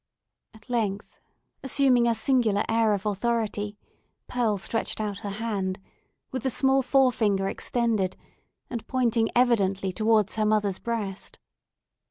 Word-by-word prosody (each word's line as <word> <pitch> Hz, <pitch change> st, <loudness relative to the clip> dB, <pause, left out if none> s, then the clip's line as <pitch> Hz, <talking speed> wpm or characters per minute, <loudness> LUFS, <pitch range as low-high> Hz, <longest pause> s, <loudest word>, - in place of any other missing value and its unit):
At 220 Hz, +1 st, -18 dB
length, 215 Hz, -5 st, -2 dB, 0.5 s
assuming 260 Hz, -3 st, +3 dB
a 230 Hz, -, +2 dB
singular 225 Hz, -4 st, +2 dB
air 225 Hz, -2 st, +3 dB
of 200 Hz, +1 st, -7 dB
authority, 210 Hz, -1 st, -1 dB, 0.5 s
Pearl 230 Hz, -4 st, 0 dB
stretched 225 Hz, +4 st, -2 dB
out 205 Hz, -2 st, -3 dB
her 205 Hz, -, -5 dB
hand, 200 Hz, -3 st, -2 dB, 0.5 s
with 260 Hz, -, -3 dB
the 265 Hz, -, 0 dB
small 265 Hz, +2 st, +3 dB
forefinger 235 Hz, -8 st, +2 dB
extended, 220 Hz, -4 st, -1 dB, 0.5 s
and 235 Hz, -2 st, -6 dB
pointing 235 Hz, -3 st, +1 dB
evidently 195 Hz, -6 st, +2 dB
towards 215 Hz, +1 st, +2 dB
her 215 Hz, -, +2 dB
mother's 210 Hz, -3 st, +1 dB
breast. 210 Hz, -5 st, -4 dB
220 Hz, 125 wpm, -26 LUFS, 205-240 Hz, 0.5 s, assuming